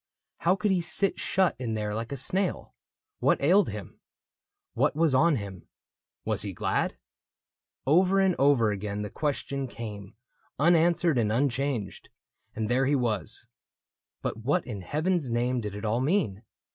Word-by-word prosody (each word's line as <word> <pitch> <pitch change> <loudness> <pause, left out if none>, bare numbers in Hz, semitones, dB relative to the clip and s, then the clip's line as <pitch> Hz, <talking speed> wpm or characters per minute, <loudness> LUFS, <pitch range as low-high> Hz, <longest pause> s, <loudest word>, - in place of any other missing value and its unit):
How 175 +3 +3
could 205 +1 0
he 185 -2 +2
sit 175 +4 0
shut 190 -2 +1
in 115 -3 -2
there 105 -1 -2
like 115 +3 -4
a 140 - -3
snail? 185 +8 -1 0.5
What - - +3
ailed 185 +8 +4
him? 105 -3 -8 0.7
What - - +1
was 160 -2 +3
on 155 +4 +4
him? 100 -6 -7 0.6
Was - - 0
he - - -2
glad? - - -1 0.9
Over 180 +7 +4
and 190 -2 +3
over 130 -6 +4
again 100 +1 -3
the 105 - -6
question 140 -2 -2
came, 105 -5 -8 0.4
Unanswered 170 -1 +3
and 105 -2 +1
unchanged, 130 -3 -1 0.2
— - - -46
and 110 -1 -2
there 130 +3 +2
he 145 - +3
was. 110 - -1 0.8
But - - -2
what 140 +10 0
in 105 -6 -6
heaven's 155 - -1
name 120 +1 0
did 105 -2 -5
it 105 +2 -6
all 115 +3 +1
mean 140 - 0
130 Hz, 160 wpm, -27 LUFS, 110-165 Hz, 0.9 s, ailed